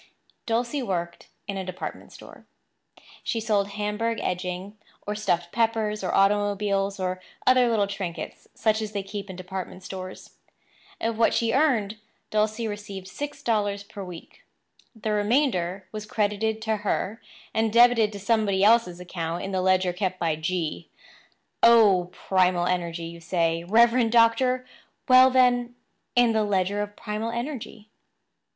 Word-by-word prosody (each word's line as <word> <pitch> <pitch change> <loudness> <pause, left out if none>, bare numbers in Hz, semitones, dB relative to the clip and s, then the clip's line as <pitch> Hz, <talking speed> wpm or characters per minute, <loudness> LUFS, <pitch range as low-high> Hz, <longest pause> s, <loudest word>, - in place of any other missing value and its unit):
Dulcie 240 +5 0
worked 175 -7 -4 0.2
in 200 -1 -3
a 190 - -3
department 185 0 -7
store. - - -14 0.8
She 230 - -1
sold 210 -3 +1
Hamburg 210 +3 -2
edging, 180 +2 -4 0.3
or 210 - -2
stuffed 175 -5 -1
peppers, 220 -2 0
or 185 - -1
automobiles, 200 0 +1
or 185 0 -2 0.2
other 255 -1 +5
little 215 -3 +2
trinkets 195 -4 -6
such 220 0 +1
as 215 -1 -5
they 200 -1 -2
keep 200 0 -7
in 190 - -7
department 185 0 -7
stores. 185 -1 -8 0.7
Of 225 0 -2
what 230 - +4
she 230 -1 +1
earned, 235 -8 +2 0.3
Dulcie 215 +2 0
received 205 -2 -7
six 285 +6 -6
dollars 205 -3 0
per 200 0 -9
week. 180 -3 -11 0.5
The 220 -1 -3
remainder 205 - +1
was 215 -1 -6
credited 215 +1 -1
to 220 -1 0
her 205 +1 -2 0.3
and 220 0 +1
debited 235 -2 +5
to 200 - -6
somebody 200 -2 +1
else's 210 -5 +4
account 170 -1 -4
in 195 - -4
the 190 -1 0
ledger 185 -1 +2
kept 185 0 -2
by 165 -3 0
G–––– 160 +1 -3 0.7
Oh, 205 -6 +6
primal 180 -2 +1
energy, 170 -2 -2
you 170 0 -9
say, 165 -1 0
Reverend 230 +3 +4
Doctor—Well 255 +2 +3
then, 245 -1 +3 0.4
in 245 -1 +5
the 220 -1 +2
Ledger 200 0 0
of 205 0 -5
Primal 220 0 -4
Energy. 235 -3 -5
205 Hz, 145 wpm, -25 LUFS, 185-225 Hz, 0.8 s, Oh